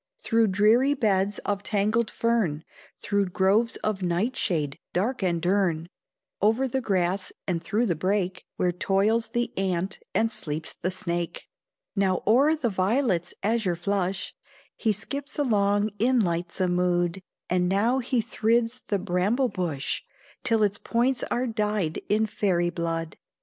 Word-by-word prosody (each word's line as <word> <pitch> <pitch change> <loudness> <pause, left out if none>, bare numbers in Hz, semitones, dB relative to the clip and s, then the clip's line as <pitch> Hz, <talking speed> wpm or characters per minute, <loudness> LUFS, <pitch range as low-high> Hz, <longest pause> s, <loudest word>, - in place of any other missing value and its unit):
Through 225 -1 +2
dreary 220 +8 +4
beds 205 -4 +1
of 200 -1 -1
tangled 215 +2 +1
fern, 215 -10 0 0.4
Through 200 -1 +1
groves 195 +6 +2
of 210 -2 -1
nightshade 175 - -1
dark 220 +8 0
and 175 -3 +1
dern, 175 -2 +1 0.5
Over 225 +6 +3
the 265 +1 -1
grass 185 -3 0
and 175 -3 -1
through 215 +7 0
the 175 -7 +1
brake, 185 +2 -1
Where 180 - +1
toils 200 +6 +1
the 240 0 -2
ant 190 0 -1 0.2
and 225 +3 +2
sleeps 155 -5 -4
the 185 - -3
snake; 175 -2 -3 0.5
Now 190 -3 +1
o'er 275 +9 +5
the 250 -7 -1
violet's 190 -2 +1
azure 215 -4 +1
flush 190 +1 -2 0.4
He 220 - +1
skips 280 +8 -5
along 205 -6 +2
in 250 +3 +3
lightsome 175 -1 0
mood; 175 0 +1 0.3
And 180 0 +1
now 225 +7 +2
he 245 -2 0
thrids 230 +2 +1
the 205 - +1
bramble 200 +7 +1
bush, 165 -8 -2 0.4
Till 225 -2 +2
its 205 0 +1
points 245 +3 +1
are 245 +1 0
dyed 210 -7 -1
in 215 +1 +3
fairy 180 -5 0
blood. 165 -2 -3
200 Hz, 140 wpm, -26 LUFS, 180-230 Hz, 0.5 s, o'er